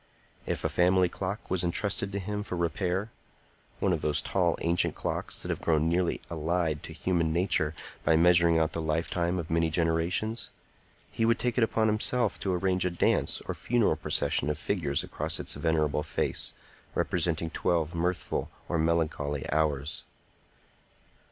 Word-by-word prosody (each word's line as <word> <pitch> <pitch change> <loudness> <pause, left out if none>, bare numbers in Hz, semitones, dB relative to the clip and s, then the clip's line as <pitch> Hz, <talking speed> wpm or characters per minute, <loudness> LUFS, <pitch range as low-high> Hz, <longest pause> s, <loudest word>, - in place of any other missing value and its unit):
If - - -2
a - - +3
family 90 0 +3
clock 100 +4 -5
was 90 -1 +1
intrusted 100 +3 0
to 100 - -3
him 105 +1 -3
for 95 -3 -4
repair,—one 90 +2 -3
of 80 - -1
those 75 -1 +1
tall, 85 +4 +1
ancient 85 +1 +1
clocks - - -2
that - - -5
have - - -3
grown 80 -1 +2
nearly 85 +1 +1
allied 80 -1 -1
to - - -8
human 85 -3 0
nature 80 -3 +1 0.3
by 80 - +4
measuring 85 0 +5
out 80 -1 +2
the 85 - -2
lifetime 85 +3 0
of 85 -1 -4
many 80 0 +2
generations,—he 85 +9 -2
would 115 +1 +4
take 125 0 0
upon 110 -1 +2
himself 110 +3 +1
to 95 - -1
arrange 90 0 +1
a 90 - +1
dance 85 - +1
or - - -1
funeral 120 -3 +1
procession - - 0
of 75 - -1
figures 75 -3 -1
across - - -3
its - - -2
venerable 75 -1 +1
face, 75 -1 -1 0.4
representing 85 -2 0
twelve 85 -2 0
mirthful 85 +2 -1 0.2
or 85 - 0
melancholy 80 -3 0
hours. 75 -1 0
85 Hz, 150 wpm, -29 LUFS, 80-95 Hz, 0.4 s, measuring